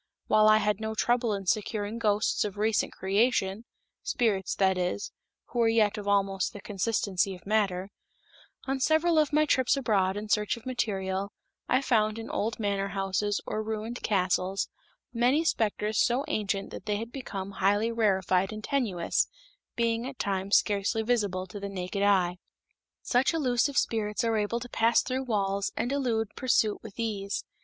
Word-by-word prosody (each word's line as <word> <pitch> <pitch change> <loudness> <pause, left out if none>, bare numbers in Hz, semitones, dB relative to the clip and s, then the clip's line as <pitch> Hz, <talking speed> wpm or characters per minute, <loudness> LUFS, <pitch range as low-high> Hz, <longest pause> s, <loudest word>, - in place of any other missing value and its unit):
While 215 0 +4
I 215 - +7
had 210 -1 0
no 220 0 -3
trouble 240 +1 +1
in 195 -1 -6
securing 210 +2 -1
ghosts 210 -1 +1
of 205 -1 -5
recent 215 0 +1
creation 200 +1 0 0.4
spirits, 200 -6 0
that 190 -1 +3
is, 180 +2 -2 0.4
who 240 - -3
were 230 - +4
yet 220 -2 +3
of 205 -1 -6
almost 195 -2 +1
the 205 - -8
consistency 195 -2 -1
of 180 - -16
matter 195 -2 0 0.7
on 270 0 -1
several 315 +3 +3
of 305 -1 +2
my 305 +1 +3
trips 260 -2 +2
abroad 200 -7 +1
in 210 +1 -5
search 210 +1 +1
of 230 - -14
material 200 -6 -2 0.4
I 260 +2 +3
found 215 -4 +2
in 225 - -6
old 220 +2 -2
manor 200 -2 0
houses 195 +1 -1
or 215 - -2
ruined 220 +2 -4
castles 190 -1 0 0.4
many 250 +6 +3
specters 215 -6 0
so 250 +3 +1
ancient 200 -2 -2
that - - -9
they 210 - +1
had 225 +3 -5
become 200 -8 -6
highly 205 +4 +3
rarefied 190 -4 +1
and 215 0 -7
tenuous, 220 -12 0 0.5
being 230 +1 0
at 270 -1 -8
times 195 0 +2
scarcely 205 +2 0
visible 205 -6 0
to 190 +3 -9
the 200 0 -5
naked 190 +1 -4
eye. 185 -3 +2 0.6
Such 260 +6 +2
elusive 265 -1 +1
spirits 210 -1 0
are 230 -1 +1
able 210 +3 -1
to 245 - -7
pass 230 0 +3
through 260 +1 -2
walls 200 -4 0
and 245 - -1
elude 235 -6 0
pursuit 230 -5 +1
with 220 0 -12
ease. 205 -3 -2
210 Hz, 165 wpm, -28 LUFS, 195-235 Hz, 0.7 s, I